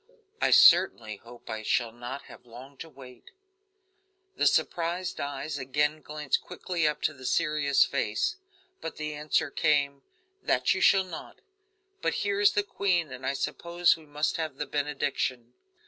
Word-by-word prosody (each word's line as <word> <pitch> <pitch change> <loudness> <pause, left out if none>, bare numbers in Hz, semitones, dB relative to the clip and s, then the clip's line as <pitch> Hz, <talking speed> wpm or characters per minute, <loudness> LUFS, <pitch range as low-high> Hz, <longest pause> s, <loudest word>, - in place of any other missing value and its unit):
"I - - +3
certainly 120 - +5
hope 120 +3 -15
I 110 0 -4
shall 115 +1 0
not 120 +4 -7
have 125 - -15
long 125 +4 -12
to 165 - -9
wait." 130 -3 -14 1.1
The - - +3
surprised 175 +1 0
eyes 140 +1 -4
again 145 +4 0
glanced 150 -1 -2
quickly 170 -4 -2
up 150 0 -2
to 155 - +1
the 130 -2 -14
serious 145 +1 +2
face, 120 - -1 0.4
but 165 - -6
the 155 0 -4
answer 150 0 0
came: 145 -3 +1 0.4
"That 125 0 +2
you 190 - -3
shall 190 +1 +5
not: 180 -3 -9 0.6
but - - 0
here 200 0 0
is 205 - +5
the 205 - +1
queen, 180 -6 0
and 130 0 -6
I 140 - +1
suppose 170 +4 +1
we 160 -2 -16
must 150 +1 -1
have 160 -4 -3
the 145 - -4
benediction." 135 -4 -2
145 Hz, 160 wpm, -28 LUFS, 130-165 Hz, 1.1 s, certainly